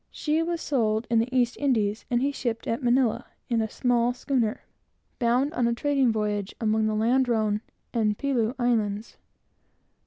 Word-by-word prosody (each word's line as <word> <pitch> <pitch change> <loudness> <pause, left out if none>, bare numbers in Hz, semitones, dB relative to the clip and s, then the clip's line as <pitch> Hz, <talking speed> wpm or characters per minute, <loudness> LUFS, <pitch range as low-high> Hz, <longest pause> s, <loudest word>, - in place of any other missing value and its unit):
She 310 +1 -1
was 340 0 -2
sold 220 -5 0
in 230 - +4
the 230 +2 0
East 245 -2 +1
Indies, 220 -7 0
and 240 +1 +1
he 280 - +1
shipped 235 -5 -3
at 230 +5 -2
Manilla, 245 -1 +1 0.2
in 230 -2 +2
a 220 - -2
small 245 0 +1
schooner, 250 -3 -1 0.6
bound 250 +5 +2
on 245 -6 +1
a 235 - 0
trading 275 -2 +2
voyage 210 -2 -2
among 220 -1 +1
the 215 - 0
Ladrone 225 -2 +1 0.3
and 215 -3 +1
Pelew 250 -4 0
Islands. 220 -4 -1
235 Hz, 160 wpm, -26 LUFS, 220-260 Hz, 0.6 s, in